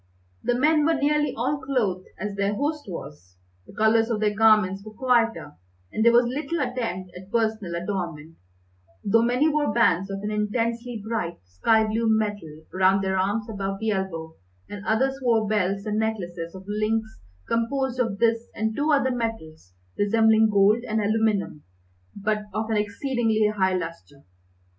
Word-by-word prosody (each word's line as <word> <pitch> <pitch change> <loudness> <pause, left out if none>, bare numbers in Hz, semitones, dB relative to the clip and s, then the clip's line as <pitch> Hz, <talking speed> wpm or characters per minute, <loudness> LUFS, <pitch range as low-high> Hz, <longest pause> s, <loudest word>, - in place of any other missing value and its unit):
The 245 - 0
men 300 +3 +3
were 325 +2 +3
nearly 295 +1 +1
all 270 +5 -1
clothed 220 -9 -1
as 205 +2 -3
their 200 +1 -1
host 295 +4 -2
was. 140 - -9 0.3
The - - -14
colours 225 +1 +3
of 225 -3 0
their 210 -1 +1
garments 210 -3 +4
were 215 0 -11
quieter, 235 -3 +1 0.4
and 220 - 0
there 235 - +6
was 240 +1 +5
little 295 +7 -3
attempt 230 -9 -3
at 185 +2 -11
personal 220 -6 -1
adornment, 170 -4 -4 0.7
though 225 +3 +3
many 250 +6 +2
wore 300 -1 +1
bands 195 -5 +2
of 195 0 -4
an 210 - -2
intensely 230 +2 -2
bright, 215 -7 -2
sky 220 - +2
blue 225 +1 0
metal 205 -8 -2
round 190 +1 +3
their 190 0 0
arms 205 +4 0
above 195 -3 -3
the 220 0 0
elbow, 165 -5 -3 0.3
and 205 -1 -8
others 265 +5 +1
wore 230 -4 +2
belts 200 -1 0
and 215 0 -1
necklaces 180 -6 -3
of 190 - -9
links 215 +1 -2 0.3
composed 255 +2 -1
of 225 -5 0
this 230 +1 +1
and 220 0 -1
two 295 +4 +1
other 275 -3 +3
metals 160 - -5 0.2
resembling 220 +1 +4
gold 205 +3 +4
and 220 -2 -1
aluminum, 215 -6 0 0.5
but 210 +1 -1
of 220 +1 -2
an - - +1
exceedingly 220 0 0
high 190 -2 +2
lustre. 165 -5 -7
215 Hz, 160 wpm, -25 LUFS, 195-235 Hz, 0.7 s, there